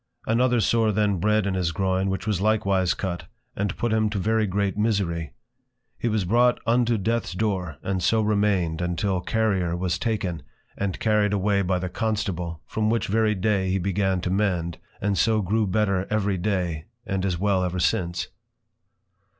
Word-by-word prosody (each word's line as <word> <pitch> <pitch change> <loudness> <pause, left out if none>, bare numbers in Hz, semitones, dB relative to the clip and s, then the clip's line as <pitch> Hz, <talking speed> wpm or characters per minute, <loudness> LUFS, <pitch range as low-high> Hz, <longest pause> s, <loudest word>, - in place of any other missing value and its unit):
Another 120 +2 +2
Sore 110 0 +2
then 105 -1 +1
bred 105 +2 +2
in 100 - 0
his 90 -3 0
Groin, 95 +2 0
which 95 +2 -3
was 105 -4 0
likewise 100 -4 +2
cut, 90 -3 -4 0.3
and 100 0 -2
put 120 -2 0
him 110 -1 +2
to 105 - -3
very 110 +2 +1
great 100 0 0
Misery: 100 - 0 0.7
He - - -1
was 110 -4 0
brought 120 +5 +3
unto 120 0 +2
Death's 115 +1 -1
Door, 90 -6 -2
and 95 -1 -1
so 110 +6 +3
remained 100 -6 +1
until 90 +2 -1
Carrier 95 -5 0
was 90 0 -1
taken, 95 -8 -2 0.3
and 100 -2 -3
carried 105 -2 +2
away 100 0 +2
by 90 -1 +1
the 90 +1 -3
Constable, 90 -5 -2
from 110 0 -1
which 115 +1 +1
very 110 +1 +2
Day 95 -1 +1
he 95 - +1
began 95 0 0
to 90 - -2
mend, 90 -5 0 0.2
and 100 -1 0
so 110 -1 +3
grew 105 +3 +1
better 100 -1 +1
every 100 -3 0
Day, 90 -5 -1 0.2
and 95 -1 -2
is 95 -3 0
well 95 0 +1
ever 90 0 -2
since. 85 -2 0
100 Hz, 175 wpm, -25 LUFS, 90-110 Hz, 0.7 s, brought